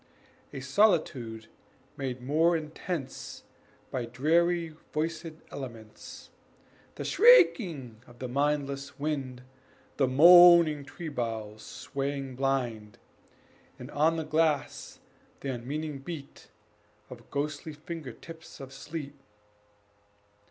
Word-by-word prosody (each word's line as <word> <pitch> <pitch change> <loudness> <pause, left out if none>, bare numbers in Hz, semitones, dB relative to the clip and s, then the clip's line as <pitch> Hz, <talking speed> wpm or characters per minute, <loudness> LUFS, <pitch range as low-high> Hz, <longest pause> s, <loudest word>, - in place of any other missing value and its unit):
A 135 - -7
solitude 130 - +1 0.5
made 130 -2 -5
more 160 +5 +3
intense 155 -1 -6 0.5
By 125 -2 -2
dreary 165 +7 +1 0.2
voiced 160 +2 -2 0.2
elements, 115 -6 -10 0.6
The - - -5
shrieking 170 - +4
of 120 - -16
the 130 - -5
mindless 140 +1 -1
wind, 135 -4 -3 0.5
The 135 - +3
moaning 170 +1 +7
tree 160 +3 -7
boughs 110 -5 -4
swaying 135 -1 -5
blind, 125 -6 -2 0.8
And - - -10
on 155 +3 +2
the 160 - -2
glass 155 -1 -1 0.4
the 135 - -3
unmeaning 145 +4 -5
beat 145 -1 -9 0.6
Of 120 -2 -12
ghostly 150 +2 -3
finger 155 -2 -7
tips 160 +7 -12
of 135 -1 -9
sleet. 145 +1 -7
140 Hz, 100 wpm, -29 LUFS, 130-160 Hz, 0.8 s, moaning